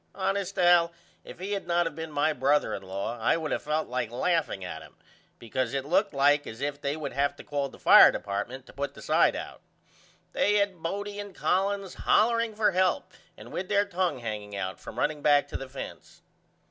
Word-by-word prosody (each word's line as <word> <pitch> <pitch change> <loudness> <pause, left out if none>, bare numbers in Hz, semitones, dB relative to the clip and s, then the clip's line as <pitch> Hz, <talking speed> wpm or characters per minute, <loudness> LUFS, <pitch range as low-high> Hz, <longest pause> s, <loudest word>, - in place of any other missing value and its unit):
Honest 195 0 -2
Al 175 -1 +5 0.3
if - - -11
he 190 +3 -5
had 200 -3 -3
not 175 0 +2
of 165 - -3
been 160 -1 -6
my 150 +1 +1
brother 145 +2 +2
in - - -4
law 100 +5 -5
I 115 - +2
would 160 -2 -4
of - - -1
felt 155 +1 -1
like 125 -2 -2
laughing 130 - -1
at 80 -3 -6
him - - -15 0.4
because 120 +2 -3
it 135 -1 -2
looked 185 +7 +2
like 145 +1 +3
as 110 - -8
if 145 +1 -3
they 140 +2 -2
would 155 - -5
have 140 +2 0
to - - -12
call 145 -2 -2
the - - -15
fire - - +8
department 115 +6 -4
to - - -15
put 140 +1 -4
the - - -11
side - - +3
out. - - -7 0.7
They 205 - +2
had 200 -4 0
Bodie 205 +4 -4
and 205 -2 -8
Collins 195 0 0
hollering 230 0 +2
for 210 -1 +3
help 185 +7 +1 0.3
and - - -12
with 185 - -4
there 205 0 +3
tongue 185 -4 -1
hanging 105 -4 -6
out 95 -1 -4
from - - -10
running 150 0 -1
back 145 -1 +4
to - - -8
the 135 - -5
fence. 135 - -9
155 Hz, 210 wpm, -28 LUFS, 130-190 Hz, 0.7 s, fire